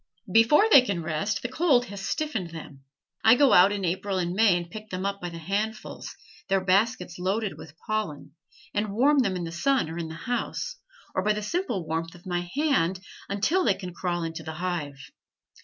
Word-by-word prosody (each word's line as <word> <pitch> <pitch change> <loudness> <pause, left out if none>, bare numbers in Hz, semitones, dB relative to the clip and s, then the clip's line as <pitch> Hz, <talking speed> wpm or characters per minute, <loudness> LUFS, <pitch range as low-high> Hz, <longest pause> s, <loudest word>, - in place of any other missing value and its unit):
Before 230 - +6
they 275 - +10
can 200 -9 -2
rest 160 +7 -2
the - - -1
cold 260 -2 +2
has 200 -4 -8
stiffened 225 - -2
them. 155 -4 -10 0.4
I 225 +2 +7
go 275 +1 +5
out 185 +3 +7
in 200 -2 -2
April 190 +3 -1
and 175 -1 -1
May 200 -2 +4
and 175 -1 -5
pick 215 +5 -10
them 185 0 -4
up 200 0 -2
by 175 - -4
the 170 - -8
handfuls, 205 +6 -4 0.3
their 195 - +3
baskets 190 -2 +1
loaded 195 +3 -1
with 160 0 -13
pollen, 165 -10 -3 0.4
and 205 -1 -1
warm 280 +5 +4
them 200 -7 +1
in 180 - -3
the 165 - -5
sun 240 - +1
or 165 - -5
in 165 - -3
the 160 - -8
house, 245 - -3 0.4
or - - 0
by 210 +2 +2
the 210 0 -4
simple 210 - -2
warmth 165 +2 -3
of 175 - -17
my 175 -1 -2
hand, 270 - +1 0.3
until 220 - +1
they - - +3
can 180 -2 -8
crawl 175 -1 -2
into 165 0 -5
the 160 - -6
hive. 160 -4 -3
195 Hz, 205 wpm, -26 LUFS, 170-225 Hz, 0.4 s, they